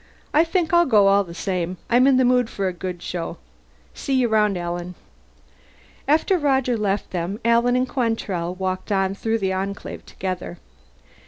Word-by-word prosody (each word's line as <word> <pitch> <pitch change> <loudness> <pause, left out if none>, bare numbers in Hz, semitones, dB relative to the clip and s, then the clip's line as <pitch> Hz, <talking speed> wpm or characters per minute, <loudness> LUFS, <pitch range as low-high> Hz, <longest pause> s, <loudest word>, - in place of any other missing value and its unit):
"I 310 - +5
think 340 -1 -1
I'll 345 0 +5
go 210 -5 +5
all 200 0 +4
the 170 -2 -11
same. 180 -1 -2
I'm 245 +3 +4
in 270 -2 +5
the 260 - +4
mood 250 -1 +3
for 195 -1 -2
a 185 - -2
good 180 0 -6
show. 170 -1 -4 0.6
See 275 - -2
you 250 -2 +2
around, 210 -3 +2
Alan." 175 +1 -4 1.1
After 320 +5 +3
Roger 265 -4 +1
left 205 -2 -1
them, 180 +3 -3
Alan 235 +1 +3
and 255 +1 +1
Quantrell 210 -9 -2
walked 185 +1 -3
on 195 -1 +1
through 225 +3 -1
the 190 -3 -1
Enclave 195 +2 -5
together. 185 -2 -5
205 Hz, 170 wpm, -22 LUFS, 185-250 Hz, 1.1 s, I